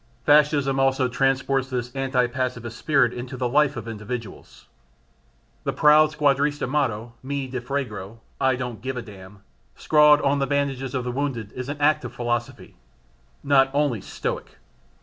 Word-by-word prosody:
Fascism 145 Hz, -2 st, +4 dB
also 135 Hz, -1 st, +2 dB
transports 135 Hz, +1 st, 0 dB
this 125 Hz, 0 st, -4 dB
anti 135 Hz, -2 st, +1 dB
pacifist 120 Hz, -2 st, -4 dB
spirit 140 Hz, -4 st, +2 dB
into 125 Hz, +1 st, -7 dB
the 125 Hz, 0 st, -1 dB
life 145 Hz, +3 st, +2 dB
of 115 Hz, -1 st, -6 dB
individuals. 110 Hz, 0 st, -7 dB, 1.0 s
The -, -, -2 dB
proud 150 Hz, +1 st, +5 dB
squadrista 145 Hz, -1 st, +1 dB
motto 120 Hz, -5 st, -1 dB
"me 140 Hz, 0 st, -3 dB
ne 130 Hz, 0 st, -4 dB
frego" 120 Hz, -6 st, -5 dB, 0.2 s
("I 130 Hz, -1 st, +2 dB
don't 125 Hz, -4 st, -5 dB
give 130 Hz, 0 st, -4 dB
a 125 Hz, -, -4 dB
damn") 100 Hz, -2 st, -13 dB, 0.3 s
scrawled 150 Hz, -1 st, +5 dB
on 140 Hz, 0 st, +1 dB
the 135 Hz, -, 0 dB
bandages 135 Hz, -1 st, -1 dB
of 130 Hz, -, -1 dB
the 125 Hz, -, -3 dB
wounded 125 Hz, -6 st, -3 dB
is 125 Hz, +1 st, -6 dB
an 145 Hz, 0 st, -5 dB
act 150 Hz, 0 st, +3 dB
of 120 Hz, -, -7 dB
philosophy 120 Hz, -1 st, -4 dB, 0.7 s
not 135 Hz, -1 st, +4 dB
only 140 Hz, -8 st, +1 dB
stoic. -, -, -5 dB
130 Hz, 155 wpm, -24 LUFS, 120-140 Hz, 1.0 s, proud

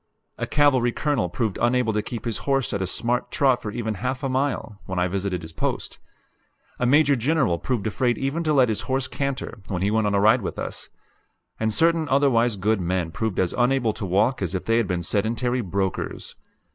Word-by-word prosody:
A -, -, -2 dB
cavalry 135 Hz, -5 st, +3 dB
colonel 135 Hz, -, 0 dB
proved 110 Hz, +1 st, -2 dB
unable 120 Hz, -1 st, +2 dB
to 105 Hz, -, +1 dB
keep 115 Hz, +3 st, -6 dB
his 115 Hz, -2 st, -2 dB
horse 135 Hz, -4 st, +1 dB
at 100 Hz, -, -1 dB
a 95 Hz, -, -1 dB
smart 120 Hz, +6 st, -1 dB
trot 130 Hz, -3 st, +2 dB
for 105 Hz, -, -4 dB
even 110 Hz, 0 st, -3 dB
half 130 Hz, +7 st, -3 dB
a 135 Hz, -, 0 dB
mile, 130 Hz, -6 st, -2 dB
when 95 Hz, -, -4 dB
I 90 Hz, 0 st, +2 dB
visited 95 Hz, -1 st, -2 dB
his 80 Hz, 0 st, -9 dB
post; -, -, -3 dB, 0.8 s
a 125 Hz, -, +1 dB
Major 145 Hz, +1 st, +5 dB
General 130 Hz, -, +1 dB
proved 120 Hz, -6 st, -2 dB
afraid 120 Hz, +2 st, 0 dB
even 140 Hz, +5 st, -1 dB
to 155 Hz, -, +2 dB
let 130 Hz, -4 st, +4 dB
his 105 Hz, -1 st, -1 dB
horse 130 Hz, -1 st, +1 dB
canter, 140 Hz, -4 st, -4 dB
when 95 Hz, -2 st, -2 dB
he 100 Hz, -, +1 dB
went 110 Hz, -1 st, +2 dB
on 100 Hz, -, +1 dB
a -, -, +3 dB
ride 110 Hz, +5 st, +5 dB
with 95 Hz, -, -5 dB
us; -, -, -5 dB, 0.7 s
and 110 Hz, 0 st, +1 dB
certain 165 Hz, +5 st, +2 dB
otherwise 120 Hz, -5 st, +3 dB
good 100 Hz, +1 st, 0 dB
men 90 Hz, -1 st, -1 dB
proved 110 Hz, +2 st, -3 dB
as 90 Hz, -2 st, +1 dB
unable 125 Hz, -2 st, +2 dB
to -, -, -7 dB
walk 105 Hz, +8 st, +2 dB
as 95 Hz, 0 st, -1 dB
if 90 Hz, -, -3 dB
they 115 Hz, 0 st, +2 dB
had 115 Hz, -4 st, +1 dB
been 90 Hz, -2 st, -2 dB
sedentary 115 Hz, +6 st, 0 dB
brokers. 95 Hz, -2 st, -3 dB
115 Hz, 210 wpm, -24 LUFS, 100-130 Hz, 0.8 s, Major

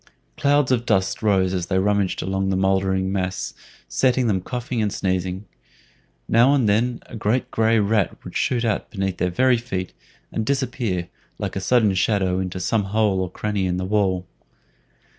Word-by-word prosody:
Clouds 145 Hz, -2 st, +2 dB
of 120 Hz, -2 st, +2 dB
dust 95 Hz, -5 st, 0 dB
rose 95 Hz, -4 st, +2 dB
as 90 Hz, -2 st, -2 dB
they 95 Hz, -, 0 dB
rummaged 100 Hz, -1 st, +1 dB
among 95 Hz, 0 st, -1 dB
the 95 Hz, -, +1 dB
mouldering 95 Hz, 0 st, +1 dB
mass, 95 Hz, -1 st, -2 dB, 0.3 s
setting 130 Hz, -1 st, +2 dB
them 100 Hz, -5 st, +1 dB
coughing 125 Hz, +2 st, -3 dB
and 105 Hz, -2 st, 0 dB
sneezing. 95 Hz, +1 st, -2 dB, 0.8 s
Now 125 Hz, +5 st, +5 dB
and 130 Hz, -6 st, +2 dB
then 115 Hz, +4 st, +1 dB
a -, -, -10 dB
great 110 Hz, +4 st, -1 dB
gray 115 Hz, 0 st, +3 dB
rat 105 Hz, -3 st, +1 dB
would -, -, -10 dB
shoot 120 Hz, -2 st, +1 dB
out 105 Hz, -3 st, -1 dB
beneath 95 Hz, -3 st, -2 dB
their 90 Hz, -, 0 dB
very 125 Hz, +7 st, +3 dB
feet, 95 Hz, -6 st, -4 dB, 0.4 s
and 110 Hz, -, -2 dB
disappear, 120 Hz, -8 st, -1 dB, 0.3 s
like -, -, -4 dB
a 95 Hz, -, -2 dB
sudden 110 Hz, -1 st, +3 dB
shadow, 95 Hz, -1 st, +1 dB
into 90 Hz, -1 st, -3 dB
some 105 Hz, +3 st, 0 dB
hole 100 Hz, -1 st, +1 dB
or 90 Hz, -, -2 dB
cranny 100 Hz, 0 st, -2 dB
in 90 Hz, 0 st, -1 dB
the 90 Hz, -, -2 dB
wall. 95 Hz, -2 st, +1 dB
100 Hz, 175 wpm, -22 LUFS, 95-115 Hz, 0.8 s, Now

